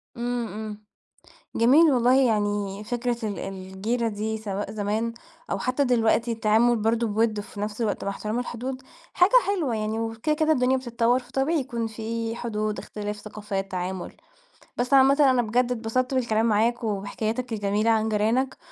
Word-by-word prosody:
امم، 240 0 -2
امم. 215 -1 -7 0.7
جميل 285 +8 +6
والله، 255 +1 +4
يعني 205 -2 -1
فكرة 240 +1 -2
ال 205 - -4
الجيرة 195 +5 -3
دي 220 +1 -3
سواء 205 -1 -4
زمان، 215 +2 -2 0.4
أو - - -1
حتى 255 +3 0
دلوقتي 235 -2 +2
التعامل 225 +2 +3
برضه 225 +1 +1
بوِد 215 0 +1
وفي 205 0 -9
نفس 210 +2 -3
الوقت 215 -3 -1
مع - - -1
احترام 215 +3 -3
الحدود، 250 +2 -5 0.3
حاجة 360 +3 +4 0.2
حلوة 335 - 0
يعني 215 +1 -2
وكده 225 +7 -1
كده 315 +1 +2
الدنيا 260 -2 +3
بتتطور، 240 -1 +1
فطبيعي 270 +5 -1
يكون 235 -4 -3
في 225 +1 -4
حدود، 215 -3 -3
اختلاف 210 0 -5
ثقافات، 205 -2 -5
تعامل. 185 0 -4 0.6
بس 250 +3 -1
عامةً، 270 +1 +6
أنا 250 -1 +3
بجد 240 +2 +1
اتبسطت 250 +2 -1
بالكلام 225 -4 +1
معاك، 230 +2 +2
وبحكاياتك 220 +3 -2
الجميلة 205 +1 0
عن 220 0 +2
جيرانك 225 +5 +1
225 Hz, 155 wpm, -25 LUFS, 210-245 Hz, 0.7 s, جميل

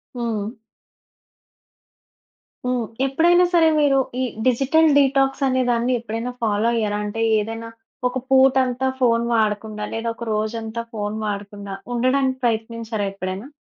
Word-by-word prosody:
హ్మ్. 225 -4 -2 2.2
హ్మ్. 250 -2 0 0.2
ఎప్పుడైనా 345 +6 +4
సరే 330 -2 +5
మీరు 275 -2 +4 0.2
ఈ - - +1 0.2
డిజిటల్ 275 +6 +3
డీటాక్స్ 270 0 +2
అనే 260 0 +1
దాన్ని 240 +1 +1
ఎప్పుడైనా 230 +2 -4
ఫాలో 215 0 +1
అయ్యారా? 210 -2 0
అంటే 210 +2 -4 0.2
ఏదైనా 225 +2 -5 0.4
ఒక 250 +1 -3
పూట 265 0 +6
అంతా, 250 +1 -1
ఫోన్ 235 -2 +3
వాడకుండా 215 -1 -1
లేదా 225 +1 -2
ఒక 235 - -7
రోజంతా 220 +1 -3
ఫోన్ 210 -1 -3
వాడకుండా 205 -1 -5 0.2
ఉండడానికి 260 +2 +1
ప్రయత్నించారా 225 -2 -1
ఎప్పుడైనా? 190 +4 -5
230 Hz, 125 wpm, -22 LUFS, 215-260 Hz, 2.2 s, పూట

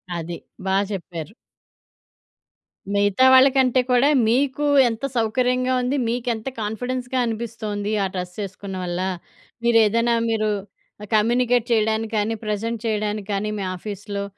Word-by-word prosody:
అది. 170 0 -4 0.3
బా 190 - +1
జెప్పారు. 170 -4 -6 1.6
మిగతా 205 +5 +3
వాళ్ళకంటే 260 -1 +5
కూడా 250 +4 +4 0.2
మీకు 275 +4 +1 0.2
ఎంత 225 +4 -4
సౌకర్యంగా 250 +3 +1
ఉంది, 255 +3 0
మీకెంత 235 -1 -2
కాన్ఫిడెన్స్‌గా 245 +4 -3
అనిపి‌స్తోంది. 215 -2 -4
ఆ - - +1
డ్రెస్ 180 -1 -5
ఏసుకున్న 190 0 -8
వల్ల 175 0 -3 0.6
మీరేదన్నా 230 0 +4
మీరు 215 -1 +1 0.5
ఆహ్, 210 - -8
కమ్యూనికేట్ 240 +2 +2
చేయడానికి 220 0 +1
కానీ, 215 +2 0
ప్రెజెంట్ 220 +2 -2
చేయడానికి 210 -2 -2
కానీ, 200 +2 -1
మీ - - -2
ఆఫీస్‌లో 200 +1 -5
220 Hz, 115 wpm, -22 LUFS, 205-245 Hz, 1.6 s, వాళ్ళకంటే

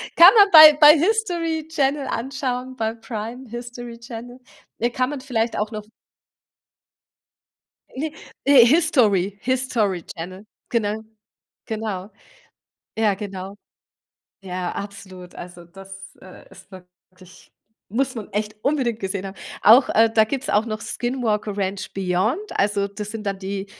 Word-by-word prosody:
Kann 350 +4 +9
man 405 -1 +7
bei 310 -2 +11
bei 300 +1 +9
HISTORY 340 -5 -1
Channel 280 -3 0
anschauen, 255 +1 -4
bei 225 -2 -2
Prime 230 +2 -7
HISTORY 240 0 -8
Channel. 240 +1 -10 0.4
Äh, 235 - +1
kann 255 +2 -1
man 285 - -6
vielleicht 235 -4 -2
auch 210 +1 -2
noch 215 -1 -6 2.1
Ne. 300 +3 -4 0.3
Äh, 275 -3 +7
HISTORY 230 - +2
HISTORY 240 -8 -1
Channel, 185 +4 -9 0.2
genau. 215 -3 -1 0.7
Genau. 215 -3 -5 0.9
Ja, 215 -3 +2
genau. 195 -1 -7 0.9
Ja, 180 -2 -4
absolut. 195 -3 -9
Also, 175 -1 -11
das, 195 +2 -13
äh, 185 - -15
ist - - -17
wirklich 185 0 -18 0.4
muss 260 +3 -1
man 220 -5 -8
echt 210 +1 -3
unbedingt 260 -6 0
gesehen 195 0 -4
haben. 195 0 -8 0.3
Auch, 235 +6 +7
äh 225 0 +3
da 220 -1 +5
gibt's 270 +5 -4
auch 210 +2 +2
noch 215 -1 -4
„Skinwalker 225 -5 -3
Ranch 195 0 -3
Beyond“. 195 - 0 0.2
Also, 200 0 +1
das 205 +1 -8
sind 220 -2 -7
dann 195 -1 -3
die, 195 0 -5
220 Hz, 135 wpm, -22 LUFS, 195-260 Hz, 2.1 s, bei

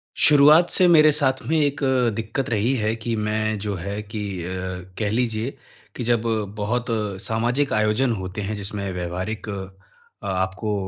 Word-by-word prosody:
शुरुआत 150 +3 +6
से 180 -2 +6
मेरे 155 -3 +7
साथ 135 -3 +1
में 160 - +2
एक 145 -1 0
अ, 130 -3 +2
दिक्कत 115 +4 -3
रही 115 +3 +1
है 110 -2 0
कि 115 0 -3
मैं 110 0 -1
जो 100 0 -3
है 100 +4 -4
कि 105 +1 -6 0.2
अ, - - -5 0.5
कह 105 -2 0
लीजिए 115 +2 -1 0.4
कि 125 - -4
जब 120 -1 +2 0.4
बहुत 115 +4 -1 0.4
सामाजिक 120 +7 0
आयोजन 110 +4 +2
होते 95 0 -5
हैं 105 +2 -3
जिसमें 100 -1 -4
व्यावहारिक 90 +5 -4
अ, 100 - -10
आपको 95 +3 -1
110 Hz, 160 wpm, -23 LUFS, 105-130 Hz, 0.5 s, मेरे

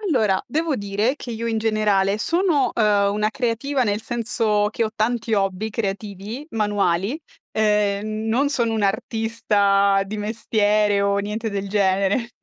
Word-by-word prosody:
Allora, 220 - +1
devo 315 +3 -1
dire 205 +6 -1
che 245 - -7
io 230 +1 -4
in 225 -1 0
generale 210 -2 +1
sono 335 - +1
ehm, 205 -2 +2
una 210 +1 0
creativa 255 +4 -1
nel 210 -2 0
senso 225 -3 0
che 230 - -1
ho 215 - -2
tanti 225 +1 0
hobby 195 +1 -1
creativi 210 +4 -5
manuali. 205 - 0 0.3
Ehm, 210 0 0
non 260 +6 +2
sono 235 -5 0
un'artista 200 -2 +1
di 210 +2 -5
mestiere 210 -1 +1
o 200 0 +1
niente 215 +2 -3
del 200 -1 -3
genere, 200 +3 +1
215 Hz, 140 wpm, -22 LUFS, 200-230 Hz, 0.3 s, ehm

